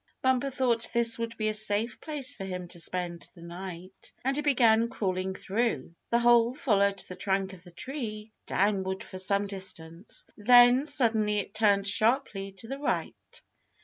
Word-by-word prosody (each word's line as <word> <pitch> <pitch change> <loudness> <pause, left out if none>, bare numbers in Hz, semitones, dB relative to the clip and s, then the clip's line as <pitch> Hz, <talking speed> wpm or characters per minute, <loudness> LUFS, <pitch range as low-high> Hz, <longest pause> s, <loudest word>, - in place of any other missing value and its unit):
Bumper 260 +1 +2
thought 245 -3 +1
this 235 -1 +4
would 230 0 -4
be 215 - -1
a 215 - 0
safe 215 +2 +1
place 290 -3 0
for 195 - -8
him 180 -2 -5
to 175 - -7
spend 175 0 -3
the 170 - -13
night, 180 +1 -9
and 270 +1 +1
he 295 - 0
began 235 -5 +3
crawling 190 -5 -2
through. 195 - -2 0.2
The 235 - +3
hole 240 0 +4
followed 200 -7 +2
the 180 - -8
trunk 190 0 -1
of 185 - -13
the 180 - -13
tree 220 - -6 0.2
downward 190 -1 0
for 185 - -8
some 200 +2 +1
distance. 190 -2 -7
Then 245 +5 +6
suddenly 220 -7 +2
it 200 0 -3
turned 205 -2 +2
sharply 215 -2 0
to 195 +4 -9
the 270 +3 -5
right. 290 - -4
210 Hz, 170 wpm, -28 LUFS, 190-240 Hz, 0.2 s, Then